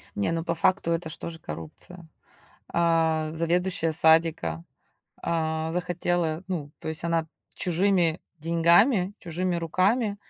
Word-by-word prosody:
Не, 100 Hz, +9 st, 0 dB
ну 165 Hz, 0 st, -1 dB
по 170 Hz, -, -1 dB
факту 175 Hz, +1 st, +2 dB
это 165 Hz, -1 st, -1 dB
ж 165 Hz, -, -5 dB
тоже 165 Hz, -1 st, -7 dB
коррупция. 80 Hz, -, -9 dB, 0.6 s
А, 165 Hz, -2 st, +1 dB
заведующая 170 Hz, 0 st, 0 dB
садика, 160 Hz, -, +3 dB, 0.6 s
а, 160 Hz, -1 st, -1 dB
захотела, 175 Hz, -2 st, -1 dB
ну, 155 Hz, -6 st, -4 dB
то -, -, -7 dB
есть 160 Hz, +1 st, -4 dB
она 165 Hz, -1 st, 0 dB, 0.3 s
чужими 180 Hz, -2 st, +1 dB, 0.2 s
деньгами, 175 Hz, -, +3 dB
чужими 175 Hz, +1 st, -2 dB
руками, 200 Hz, +6 st, +1 dB
165 Hz, 120 wpm, -26 LUFS, 160-180 Hz, 0.6 s, садика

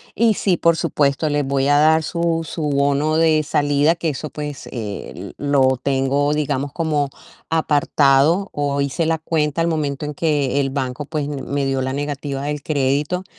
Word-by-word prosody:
Y 225 Hz, -2 st, +3 dB
sí, 185 Hz, -3 st, +1 dB
por 170 Hz, -1 st, +3 dB
supuesto, 145 Hz, +1 st, +1 dB
les 145 Hz, -1 st, 0 dB
voy 135 Hz, 0 st, 0 dB
a 145 Hz, 0 st, +4 dB
dar 160 Hz, +1 st, +4 dB
su 170 Hz, 0 st, -1 dB
su 155 Hz, -2 st, -3 dB
bono 145 Hz, +2 st, +1 dB
de 160 Hz, -2 st, +3 dB
salida, 145 Hz, +2 st, +2 dB
que 165 Hz, -, -3 dB
eso, 150 Hz, +1 st, -5 dB
pues, 150 Hz, -2 st, -6 dB
eh, 105 Hz, -4 st, -6 dB
lo 135 Hz, -2 st, +2 dB
tengo 140 Hz, +2 st, +1 dB
digamos 140 Hz, -2 st, -1 dB
como 150 Hz, -4 st, 0 dB, 0.4 s
apartado, 150 Hz, +2 st, +3 dB
o 140 Hz, -1 st, -1 dB
hice 140 Hz, +4 st, -1 dB
la 165 Hz, 0 st, +1 dB
cuenta 155 Hz, -1 st, -1 dB
al 165 Hz, -, +1 dB
momento 150 Hz, -3 st, -2 dB
en 150 Hz, -, -4 dB
que 145 Hz, -4 st, 0 dB
el 135 Hz, -, -1 dB
banco, 135 Hz, 0 st, -3 dB
pues, 150 Hz, -1 st, -3 dB
me 140 Hz, -1 st, -3 dB
dio 135 Hz, -1 st, 0 dB
la 130 Hz, -, -2 dB
negativa 140 Hz, -1 st, -4 dB
del 145 Hz, 0 st, -3 dB
crédito. 145 Hz, +5 st, 0 dB
145 Hz, 175 wpm, -20 LUFS, 140-155 Hz, 0.4 s, a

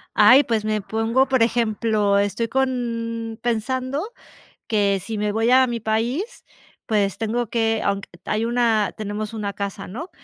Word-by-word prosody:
Ay, 250 Hz, +7 st, +7 dB
pues, 225 Hz, -3 st, -1 dB
me 215 Hz, -1 st, 0 dB
pongo 225 Hz, +6 st, +1 dB
por 260 Hz, -3 st, +3 dB
ejemplo, 215 Hz, -3 st, +1 dB
estoy 205 Hz, +3 st, 0 dB
con 230 Hz, -3 st, -2 dB
pensando 255 Hz, +5 st, -1 dB, 0.6 s
que 200 Hz, -3 st, +2 dB
si 220 Hz, +1 st, -5 dB
me 210 Hz, 0 st, 0 dB
voy 225 Hz, +2 st, +1 dB
a 260 Hz, +1 st, +6 dB
mi 235 Hz, -2 st, -3 dB
país, 240 Hz, -, -2 dB, 0.4 s
pues, 205 Hz, -3 st, 0 dB
tengo 230 Hz, +1 st, -1 dB
que 225 Hz, -1 st, +1 dB
aunque 200 Hz, 0 st, -1 dB, 0.2 s
hay 215 Hz, +1 st, -1 dB
una 230 Hz, -3 st, +1 dB
tenemos 215 Hz, +1 st, -4 dB
una 205 Hz, -2 st, -3 dB
casa, 200 Hz, -2 st, -5 dB
¿no?, 265 Hz, -, -7 dB
225 Hz, 150 wpm, -22 LUFS, 210-240 Hz, 0.6 s, Ay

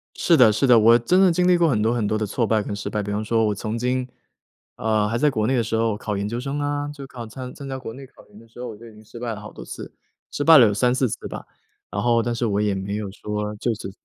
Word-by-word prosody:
是 170 Hz, -, +3 dB
的 125 Hz, -7 st, +6 dB
是 110 Hz, +6 st, +1 dB
的， 125 Hz, -2 st, +7 dB
我 115 Hz, +2 st, +6 dB
真 180 Hz, +11 st, +2 dB
的 190 Hz, -2 st, +5 dB
经 180 Hz, +2 st, +2 dB
历 180 Hz, -1 st, +5 dB
过 170 Hz, -1 st, +3 dB
很 110 Hz, -6 st, +1 dB
多 110 Hz, +2 st, +2 dB
很 120 Hz, -3 st, -1 dB
多 110 Hz, -, 0 dB
的 110 Hz, -, -1 dB
挫 115 Hz, +4 st, -1 dB
败 110 Hz, -1 st, +1 dB
跟 100 Hz, -, -4 dB
失 100 Hz, -, -5 dB
败。 105 Hz, -, -2 dB
比 105 Hz, -, -4 dB
方 105 Hz, +1 st, -2 dB
说 115 Hz, +1 st, +1 dB
我 105 Hz, -, -1 dB
曾 110 Hz, +3 st, -4 dB
经， 125 Hz, +1 st, -1 dB, 0.7 s
呃， 110 Hz, -1 st, +1 dB
还 115 Hz, +2 st, -1 dB
在 150 Hz, +5 st, +3 dB
国 110 Hz, -6 st, -1 dB
内 130 Hz, -, +1 dB
的 120 Hz, -, +1 dB
时 110 Hz, +1 st, -2 dB
候 110 Hz, -1 st, +1 dB
考 105 Hz, -1 st, -4 dB
研 100 Hz, +1 st, -2 dB
究 115 Hz, +3 st, -3 dB
生 140 Hz, +3 st, -4 dB
啊， 145 Hz, 0 st, -2 dB
就 145 Hz, -2 st, -9 dB
考 125 Hz, -3 st, -8 dB
参 125 Hz, +3 st, -8 dB
参 140 Hz, -, -9 dB
加 135 Hz, -1 st, -4 dB
国 125 Hz, -3 st, -7 dB
内 135 Hz, +3 st, -10 dB
考 -, -, -20 dB
研 105 Hz, -, -18 dB
的 115 Hz, -, -17 dB
时 115 Hz, -, -16 dB
候， 125 Hz, -, -5 dB
我 110 Hz, -3 st, -8 dB
就 115 Hz, +2 st, -13 dB
已 110 Hz, -, -14 dB
经 105 Hz, 0 st, -16 dB
失 115 Hz, +2 st, -12 dB
败 120 Hz, -1 st, -3 dB
了 105 Hz, -, -8 dB
好 105 Hz, 0 st, -10 dB
多 -, -, -9 dB
次， -, -, -9 dB, 0.4 s
失 145 Hz, -, -2 dB
败 160 Hz, +1 st, +8 dB
了 120 Hz, -4 st, +8 dB
有 105 Hz, -, 0 dB
3-4 125 Hz, +4 st, +2 dB
次 -, -, -6 dB
吧。 -, -, -8 dB, 0.5 s
然 100 Hz, -, -2 dB
后 115 Hz, +1 st, +3 dB
但 120 Hz, +1 st, -2 dB
是 120 Hz, -, -1 dB
我 105 Hz, -2 st, 0 dB
也 105 Hz, -2 st, 0 dB
没 95 Hz, +1 st, -4 dB
有 105 Hz, -2 st, -5 dB
说 105 Hz, +1 st, -4 dB
就 115 Hz, +3 st, -1 dB
此 100 Hz, -2 st, -7 dB
115 Hz, 335 characters per minute, -23 LUFS, 105-130 Hz, 0.7 s, 败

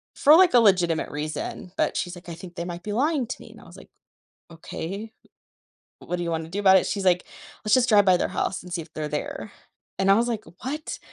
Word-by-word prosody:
For, 300 Hz, +3 st, +6 dB
like, 360 Hz, -3 st, +6 dB
a 245 Hz, -, +7 dB
legitimate 180 Hz, -7 st, +3 dB
reason, 155 Hz, +4 st, -5 dB
but -, -, 0 dB
she's, 180 Hz, 0 st, -3 dB
like, 175 Hz, 0 st, -12 dB
"I 170 Hz, -, -6 dB
think 175 Hz, 0 st, -11 dB
they 170 Hz, -, -4 dB
might 175 Hz, 0 st, -7 dB
be 210 Hz, -, -4 dB
lying 280 Hz, +3 st, +1 dB
to 255 Hz, -, -6 dB
me," -, -, -13 dB
and -, -, -15 dB
I -, -, -15 dB
was, -, -, -14 dB
like, -, -, -15 dB, 0.6 s
"Okay, 195 Hz, +6 st, -7 dB, 0.9 s
w -, -, -15 dB
what 180 Hz, -, -1 dB
do 175 Hz, -, -4 dB
you 170 Hz, -, -2 dB
wanna 160 Hz, -1 st, -3 dB
do 195 Hz, +5 st, -3 dB
about 190 Hz, -1 st, +6 dB
it?" 190 Hz, -, +3 dB
She's, 200 Hz, -2 st, -2 dB
like, 180 Hz, -1 st, +3 dB, 0.4 s
"Let's 210 Hz, -, +4 dB
just 255 Hz, -1 st, +3 dB
drive 205 Hz, -2 st, +6 dB
by 185 Hz, -2 st, +5 dB
their -, -, -1 dB
house, 190 Hz, -, -2 dB
and 180 Hz, -, -10 dB
see 170 Hz, -, -2 dB
if -, -, -17 dB
they're 155 Hz, -1 st, -3 dB
there," 150 Hz, +7 st, -5 dB, 0.5 s
and 195 Hz, 0 st, +1 dB
I -, -, +8 dB
was, 235 Hz, +3 st, +2 dB
like, 220 Hz, -2 st, -3 dB, 0.2 s
"What?" 300 Hz, +4 st, -4 dB
190 Hz, 255 wpm, -25 LUFS, 170-220 Hz, 0.9 s, I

